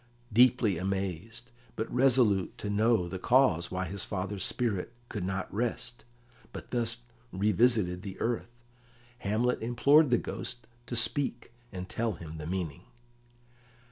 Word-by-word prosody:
Deeply 115 -6 +4
amazed, 95 +4 -3 0.2
but 110 - -2
resolute 125 -7 +3
to 105 - -4
know 110 -3 +3
the 95 +1 -5
cause 120 -9 +3
why 95 +1 -2
his 100 +1 -3
father's 95 0 -3
spirit 115 -2 -1 0.2
could 105 -4 -4
not 95 0 -3
rest, 120 +2 -3 0.5
but - - -9
thus 120 -1 -1 0.3
revisited 105 -2 +2
the 95 -1 -8
earth, 115 0 -1 0.7
Hamlet 115 +4 0
implored 140 +6 +4
the 120 - +4
Ghost 125 -1 -6 0.2
to 120 - -4
speak 120 +1 0 0.2
and 90 -1 -6
tell 115 +2 -1
him 80 -2 -9
the 75 - -6
meaning. 85 -6 -3
105 Hz, 135 wpm, -30 LUFS, 95-120 Hz, 0.7 s, Deeply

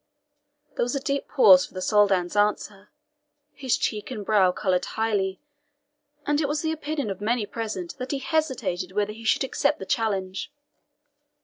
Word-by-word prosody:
There - - +1
was 245 +3 -2
a - - 0
deep 280 0 -2
pause 280 - +7
for - - -22
the - - -3
Soldan's 195 -2 +2
answer. 205 -1 0 0.6
His 260 -3 0
cheek 210 -1 -2
and 215 -6 -6
brow 195 -4 +4
coloured 180 -1 0
highly, 205 -4 -1 0.9
and 295 +1 +1
it 290 - 0
was 295 +2 -2
the 320 - 0
opinion 300 -7 -3
of 195 - -7
many 225 +1 0
present 230 - -5
that 255 +1 -5
he 280 - -1
hesitated 255 - -2
whether 210 +1 -1
he 225 +1 -12
should 225 - +2
accept 285 +2 0
the 190 - -7
challenge. 190 -2 -2
220 Hz, 170 wpm, -25 LUFS, 195-275 Hz, 0.9 s, pause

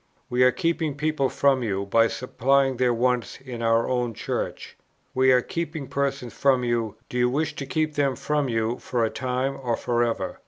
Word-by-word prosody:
We 125 +1 +4
are 125 - +7
keeping 165 -3 -1
people 150 -2 0
from 135 -2 +2
you, 100 -4 -1
by 115 +3 +4
supplying 135 +2 +1
their 125 0 +3
wants 125 +1 0
in 125 -3 -7
our 115 0 +2
own 125 -3 -1
Church. - - -4 0.4
We 130 0 +4
are 125 -1 +4
keeping 160 -3 -4
persons 140 -3 -2
from 135 -3 +2
you: 115 -3 -1
do 125 - -3
you 125 0 +3
wish 150 +4 0
us - - -9
to 135 - -5
keep 155 +1 0
them 140 -3 +1
from 150 0 -1
you 115 +1 -1
for 120 -2 0
a 110 - -2
time 130 +1 -2
or 120 -3 -1
for 120 0 0
ever? 115 -5 -2
125 Hz, 200 wpm, -25 LUFS, 120-140 Hz, 0.4 s, are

